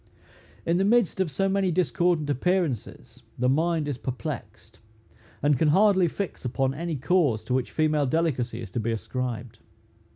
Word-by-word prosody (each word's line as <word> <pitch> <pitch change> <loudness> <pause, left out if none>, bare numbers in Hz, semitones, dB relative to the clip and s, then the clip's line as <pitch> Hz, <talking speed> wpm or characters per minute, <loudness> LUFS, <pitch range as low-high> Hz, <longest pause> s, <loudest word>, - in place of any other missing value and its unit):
In 170 +1 +2
the 190 - +2
midst 220 -2 +2
of 190 -3 +1
so 195 +7 0
many 195 -1 +1
discordant 170 -1 +1
appearances, 135 - -2 0.2
the 125 - +1
mind 160 +3 +1
is 140 -4 -3
perplexed, 125 -1 -6 0.6
and 145 -3 +3
can 160 - +3
hardly 190 +2 +4
fix 195 +4 -5
upon 135 +1 0
any 165 +2 -3
cause 145 -5 +1
to 125 - -3
which 130 -1 0
female 155 -2 +1
delicacy 125 -6 -1
is 100 - -9
to 120 - -2
be 115 +1 -1
ascribed. 120 0 -4
150 Hz, 160 wpm, -26 LUFS, 125-175 Hz, 0.6 s, hardly